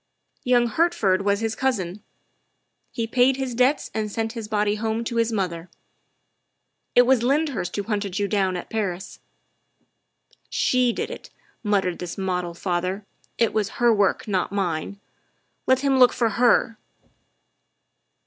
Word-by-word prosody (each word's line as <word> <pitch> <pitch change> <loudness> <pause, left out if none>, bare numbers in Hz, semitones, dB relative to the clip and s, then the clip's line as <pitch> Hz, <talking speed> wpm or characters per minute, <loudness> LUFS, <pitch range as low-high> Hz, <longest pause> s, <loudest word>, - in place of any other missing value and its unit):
Young 245 -1 +3
Hertford 230 - +1
was 200 +1 +1
his 225 -1 -1
cousin; 210 -7 -2 0.9
he 230 -3 -2
paid 250 +3 +3
his 265 -2 -3
debts 255 +5 +1
and 215 -1 -2
sent 225 +1 -2
his 225 -3 -6
body 210 -1 +1
home 220 +1 -2
to 235 0 -4
his 230 0 +2
mother. 180 -5 -3 1.3
It 245 - +8
was 255 -1 +3
Lyndhurst 270 - 0
who 205 - -2
hunted 200 -3 -3
you 205 - 0
down 190 -3 0
at 175 - -8
Paris." 195 -4 -3 0.7
" - - -39
She 250 -1 +3
did - - -4
it," - - -9 0.3
muttered 195 -5 0
this 175 -1 -6
model 180 -3 -2
father; 185 +3 -2 0.2
" - - -31
it 230 -2 +2
was 215 -2 0
her 240 -1 +4
work, 205 +1 +1
not 190 -3 -1
mine. 195 -1 -2 0.7
Let 260 0 +3
him 275 -2 +2
look 250 -1 +6
for 230 -2 +1
her." 230 0 +2
215 Hz, 150 wpm, -24 LUFS, 195-240 Hz, 1.3 s, It